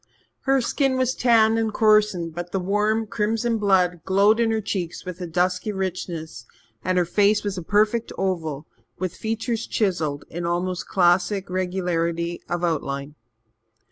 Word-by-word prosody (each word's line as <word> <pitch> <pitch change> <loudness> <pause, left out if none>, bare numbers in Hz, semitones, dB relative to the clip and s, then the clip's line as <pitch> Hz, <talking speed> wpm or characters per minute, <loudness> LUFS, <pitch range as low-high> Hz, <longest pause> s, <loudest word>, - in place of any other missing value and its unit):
Her 270 -1 +4
skin 265 +2 +1
was 255 -1 +1
tanned 225 -3 +4
and 220 -1 0
coarsened, 210 -6 +3
but 175 +1 -6
the 195 - 0
warm 210 +4 +1
crimson 225 +2 -1
blood 180 -4 +2
glowed 200 +4 +4
in 230 -1 +3
her 220 0 +1
cheeks 190 -5 -4
with 180 0 -7
a 175 - -3
dusky 180 +4 0
richness, 170 - -5 0.4
and 185 0 0
her 180 - +3
face 205 +4 +2
was 205 -2 -2
a 180 - -4
perfect 215 +5 +1
oval, 160 -6 -2 0.3
with 185 -1 -3
features 225 +1 -3
chiselled 165 -9 -1
in 175 +1 -6
almost 175 +1 -2
classic 180 +1 +2
regularity 175 -2 -1
of 175 0 -2
outline. 140 -4 -2
185 Hz, 150 wpm, -23 LUFS, 175-215 Hz, 0.4 s, Her